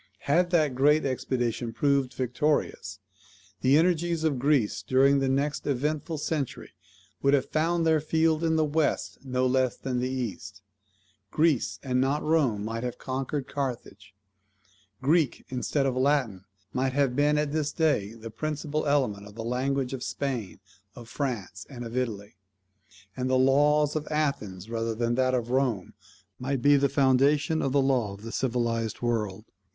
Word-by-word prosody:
Had 175 +5 +2
that 155 -6 +2
great 145 +4 +3
expedition 120 -3 -2
proved 140 -1 +1
victorious, 130 +4 -1 0.6
the 135 +3 +5
energies 170 -1 +1
of 150 -5 +1
Greece 135 -7 +1
during 135 +6 +3
the 135 -1 0
next 140 +3 -1
eventful 150 +4 -1
century 150 -3 -3 0.5
would 140 +1 +4
have 140 0 -2
found 165 +2 +1
their 160 -1 +4
field 160 +1 +1
in 160 -1 +2
the 155 -1 +3
West 150 +1 -1
no 130 -1 0
less 130 -1 +1
than 130 -2 -3
in - - +1
the 125 +1 -1
East; 105 -5 -5 0.7
Greece, 155 -2 +1
and 125 -2 +1
not 140 +3 0
Rome, 135 -10 +1
might 115 +1 -3
have 125 0 -4
conquered 135 +1 -3
Carthage; 110 -8 -5 0.9
Greek 155 -1 +2
instead 135 +2 -1
of 130 -2 0
Latin 130 -8 +1 0.3
might 130 0 0
have 135 -3 +1
been 145 +1 +3
at 150 -1 0
this 150 -1 -1
day 145 - +1
the 115 0 -9
principal 155 +4 -3
element 125 -9 0
of 105 - -14
the 115 - -5
language 130 +2 -1
of 130 - -5
Spain, 125 -10 -4 0.4
of 120 -2 -11
France, 110 -9 -4
and 120 -4 -7
of 115 +1 -7
Italy; 105 -6 -3 0.8
and 130 0 -2
the 130 - +3
laws 145 +3 +3
of 155 -1 -3
Athens, 110 -11 -2
rather 115 0 -2
than 120 +2 0
of 130 -2 +1
Rome, 125 -8 0 0.5
might 130 0 -2
be 145 0 +6
the 140 0 +3
foundation 145 +3 +3
of 135 - 0
the 140 0 +3
law 125 -7 +1
of 100 - -15
the 115 - -6
civilized 115 -3 -1
world." 110 -5 -1
130 Hz, 160 wpm, -27 LUFS, 120-150 Hz, 0.9 s, be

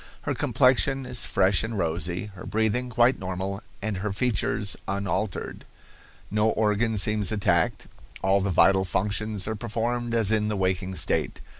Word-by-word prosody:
Her - - -2
complexion 135 +1 +2
is 125 -1 0
fresh 95 0 +3
and 110 0 -4
rosy, 85 +3 -2
her 90 - -10
breathing 110 +3 0
quite 120 +1 +3
normal, 95 +2 -4 0.2
and 105 -2 -2
her 105 +3 -3
features 105 -2 -1
unaltered. 100 0 -2 0.7
"No 105 +1 +2
organ 110 +1 +1
seems 105 0 +1
attacked; 90 -6 +1 0.4
all 95 +1 +3
the 100 - -1
vital 95 +2 +4
functions 105 +2 -1
are 110 - -1
performed 120 +2 -2
as 110 -3 +3
in 105 -1 +2
the 105 -1 -1
waking 95 0 -1
state. - - 0
105 Hz, 150 wpm, -26 LUFS, 95-110 Hz, 0.7 s, vital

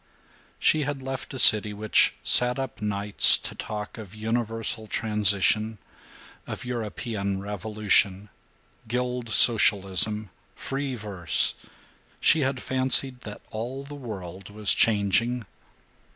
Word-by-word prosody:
II - - -34
She 155 - +1
had 145 -2 -5
left 135 0 -7
a 135 - -7
city 105 -4 +4
which 105 +1 +2
sat 125 +1 +5
up 135 -4 -7
nights 105 -1 +5
to - - -8
talk 105 +1 -8
of 105 -2 -12
universal 115 0 -4
transition; 105 +1 +1 0.7
of - - -7
European 110 -4 -5
revolution, 105 0 0 0.6
guild 125 0 -4
socialism, 105 -2 +3 0.2
free 135 -1 -5
verse. 100 - -2 0.7
She 160 - +3
had 135 -2 -3
fancied 130 0 +2
that 105 -1 -11
all 125 +5 -6
the 140 +1 -12
world 100 -8 -9
was 105 0 0
changing. 115 +3 +1
110 Hz, 115 wpm, -24 LUFS, 105-125 Hz, 0.7 s, sat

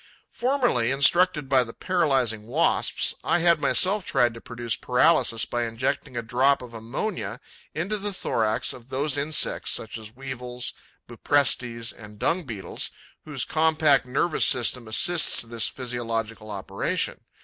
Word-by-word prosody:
Formerly, 245 - +1
instructed 150 +3 +3
by 130 -2 +4
the 115 -1 -10
paralysing 135 - 0
Wasps, 150 +8 +1
I - - +2
had 170 0 +3
myself 195 +2 +3
tried 120 -7 +2
to 115 - -11
produce 120 -1 -3
paralysis 125 -3 +2
by 120 0 -2
injecting 120 +2 -3
a 120 - -2
drop 130 +4 +2
of 120 -2 -11
ammonia 120 - -4 0.4
into 185 +7 -1
the 205 +1 -2
thorax 110 - -1
of 125 0 -14
those 140 +2 -1
insects, 145 +2 +1
such 110 0 -3
as 110 +1 -11
Weevils, 125 -2 -4 0.3
Buprestes, 120 -5 0
and 105 -1 -13
Dung 170 - 0
beetles, 110 -7 -5 0.4
whose 145 -5 -3
compact 155 -4 +3
nervous 145 +6 +1
system 125 -3 +1
assists 165 +10 +3
this 115 -1 0
physiological 115 -3 -4
operation. 100 -1 -2
125 Hz, 140 wpm, -25 LUFS, 115-155 Hz, 0.4 s, by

